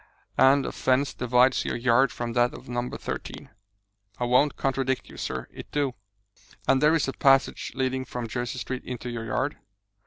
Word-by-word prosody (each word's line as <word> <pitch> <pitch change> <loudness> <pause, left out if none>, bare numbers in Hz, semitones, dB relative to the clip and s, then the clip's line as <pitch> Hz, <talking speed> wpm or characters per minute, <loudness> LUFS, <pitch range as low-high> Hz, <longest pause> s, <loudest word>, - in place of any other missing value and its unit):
"And 135 +1 +6
a - - -3
fence 130 +2 +1
divides 125 +1 +3
your - - -2
yard 120 +2 +3
from 120 -1 -4
that 120 0 +2
of - - -12
No. 120 0 -2
13?" - - -6 0.7
"I - - -1
won't 125 +4 +3
contradict 135 -1 -1
you, - - -12
sir 65 -1 -4
it - - -10
do." 145 -3 0 0.7
"And 135 -1 +4
there 150 +2 +5
is 160 - +1
a 135 - -2
passage 135 0 +3
leading 130 0 -1
from 120 -2 -5
Jersey 120 +2 -3
Street 130 0 -4
into 125 -1 -5
your 115 -1 -5
yard?" 140 +7 -1
130 Hz, 180 wpm, -26 LUFS, 120-135 Hz, 0.7 s, And